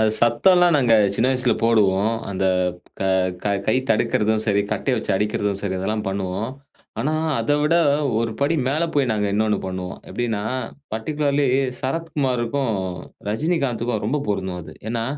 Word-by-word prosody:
அது 110 -1 +4
சத்தல்லாம் 175 +9 +4
நாங்க 125 -5 +4 0.2
சின்ன 115 - +2
வயசில 125 -1 +2
போடுவோம். 110 -1 +3 0.2
அந்த 95 0 -2 1.0
க - - +1 0.2
கை 110 - +3 0.2
தடுக்கிறதும் 110 0 +2
சரி, 100 -2 +3
கட்டய 135 - 0
வச்சு 110 - -1
அடிக்கிறதும் 105 -1 -1
சரி, 100 -2 -2
இதெல்லாம் 105 +3 -2
பண்ணுவோம். 95 +3 -3 0.5
ஆனா 150 - 0 0.3
அத 115 +6 0
விட 150 +3 +2 0.4
ஒருபடி 115 +7 0
மேல 150 +5 0
போய் 140 -3 +2
நாங்க 105 -1 0
இன்னொன்னு 105 0 +1
பண்ணுவோம். 95 0 -5
எப்படின்னா 115 -4 -2 0.5
பர்ட்டிகுலர்லி 145 +4 0 0.3
சரத்குமாருக்கும், 135 -4 -1 0.6
ரஜினிகாந்துக்கும் 120 -3 -1
ரொம்ப 145 +6 0
பொருந்தும் 95 -3 -2
அது. - - -11 0.2
ஏன்னா, 115 -1 -1
115 Hz, 135 wpm, -22 LUFS, 105-135 Hz, 1.0 s, அது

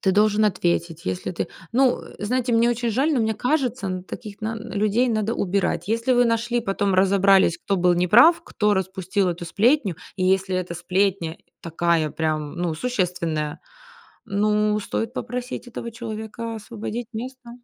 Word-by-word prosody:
ты 190 - +2
должен 210 +1 +3
ответить. 170 -4 0
Если 95 - -3
ты 175 - -3 0.3
Ну, 260 0 +3
э, - - -13
знаете, 245 +2 0
мне 230 +1 +4
очень 240 0 -1
жаль, 275 +8 +1
но 245 - +2
мне 220 0 +1
кажется, 250 -4 0
н 185 -1 -3
таких 205 +1 -9
нан 220 +1 -5
людей 215 +5 +2
надо 220 0 0
убирать. 190 -2 -1
Если 230 +4 0
вы 245 0 +5
нашли, 235 +1 +1
потом 195 -2 0
разобрались, 195 -1 +4
кто 200 - -1
был 180 -1 +3
неправ, 230 - +6
кто 210 -1 +1
распустил 190 0 -1
эту 175 0 -4
сплетню, 210 - +2 0.2
и 185 - 0
если 190 0 +2
эта 180 -1 -3
сплетня 180 -1 0 0.2
такая 165 -2 0
прям 155 -2 -2
ну 175 -2 -1
существенная, 170 -9 -2 0.7
ну 210 +1 +1
стоит 225 +3 -3
попросить 250 -1 -5
этого 235 0 -6
человека 225 0 -6
освободить 220 +2 -6
место. 255 +2 -7
205 Hz, 160 wpm, -23 LUFS, 180-230 Hz, 0.7 s, неправ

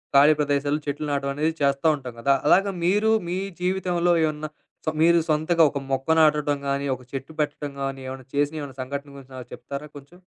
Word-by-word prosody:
ఖాళీ 145 +3 +7
ప్రదేశాలు 145 +1 0
చెట్లు 145 +2 -2
నాటడం 140 -1 -1
అనేది 155 +3 0
చేస్తా 140 +2 +2
ఉంటాం 130 -4 -8
గదా! 140 +4 +3
అలాగా 195 +5 +4
మీరు 205 +5 +3 0.2
మీ 180 - -1 0.2
జీవితంలో 180 -1 +1
ఏమన్నా 155 0 -3 0.4
సొ 155 - +1
మీరు 170 +1 +6
సొంతగా 160 +2 +3
ఒక 140 - -4
మొక్క 135 0 -1
నాటటం 150 -2 +3
గాని, 140 0 -1
ఒక 130 - -14
చెట్టు 135 +2 -6
పెట్టటం 150 -1 -2
గాని, 135 0 -3
ఏమన్నా 130 0 -7
చేసిన 145 +1 +1
ఏమైనా 140 -3 -8
సంఘటన 140 +2 -5
గురించి 135 -1 -13
నాకు 125 -1 -9
చెప్తారా 140 +2 -7
కొంచెం? 145 +6 -15
145 Hz, 185 wpm, -24 LUFS, 140-160 Hz, 0.4 s, ఖాళీ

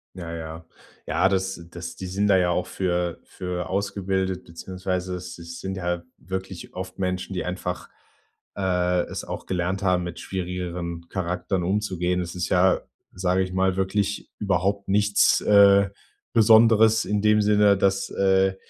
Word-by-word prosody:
Ja, 85 -3 -6
ja. 80 0 -7 0.4
Ja, 90 +4 +2
das 95 -1 -1
das 85 -1 -7
die 95 - -6
sind 100 +3 0
da 95 - +5
ja 90 -1 +2
auch 90 +1 0
für 90 -2 -2
für 90 -1 -5
ausgebildet, 95 -1 -1
beziehungsweise 90 +2 -4
es 90 -1 -7
es 85 0 -9
sind 95 0 -4
ja 90 -1 -2
wirklich 95 -1 -7
oft 95 0 -7
Menschen, 90 0 -2
die 90 - -2
einfach 90 0 -4 0.7
äh, 90 -2 +1
es - - -6
auch - - -6
gelernt 95 +2 -1
haben 90 -2 +2
mit 85 -1 -6
schwierigeren 90 -2 -4
Charakteren 90 0 -2
umzugehen. 90 -2 0
Es 85 -1 -5
ist 90 0 -2
ja, 90 0 +4 0.3
sage 90 0 +1
ich 90 -1 -4
mal, 95 0 +1
wirklich 100 +1 -1
überhaupt 100 0 0
nichts, 105 +1 +4
äh, 100 -1 +6 0.4
Besonderes 110 -1 +6
in 105 0 0
dem 105 0 +4
Sinne, 105 -1 +4
dass 95 0 +1
äh, 95 0 +2
95 Hz, 155 wpm, -24 LUFS, 90-100 Hz, 0.7 s, äh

